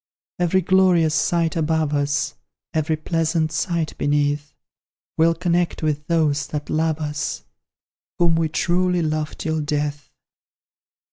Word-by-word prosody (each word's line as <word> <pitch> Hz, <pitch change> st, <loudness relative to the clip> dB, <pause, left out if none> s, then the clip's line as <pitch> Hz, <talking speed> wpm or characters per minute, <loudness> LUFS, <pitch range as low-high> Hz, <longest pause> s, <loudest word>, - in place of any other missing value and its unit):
Every 180 Hz, +2 st, +2 dB
glorious 180 Hz, -3 st, +3 dB
sight 165 Hz, +2 st, +1 dB
above 160 Hz, -2 st, 0 dB
us, 145 Hz, 0 st, 0 dB, 0.4 s
Every 155 Hz, 0 st, 0 dB
pleasant 160 Hz, 0 st, 0 dB
sight 160 Hz, 0 st, -1 dB
beneath, 145 Hz, 0 st, 0 dB, 0.6 s
We'll 165 Hz, +1 st, +3 dB
connect 175 Hz, -1 st, 0 dB
with 150 Hz, 0 st, -1 dB
those 150 Hz, -4 st, +1 dB
that 150 Hz, -1 st, -5 dB
love 160 Hz, 0 st, +1 dB
us, 150 Hz, -1 st, -3 dB, 0.7 s
Whom 170 Hz, -1 st, +3 dB
we 165 Hz, -1 st, +1 dB
truly 180 Hz, +2 st, +1 dB
love 155 Hz, -1 st, -2 dB
till 160 Hz, -1 st, -2 dB
death! 145 Hz, -1 st, -2 dB
160 Hz, 120 wpm, -22 LUFS, 150-170 Hz, 0.7 s, glorious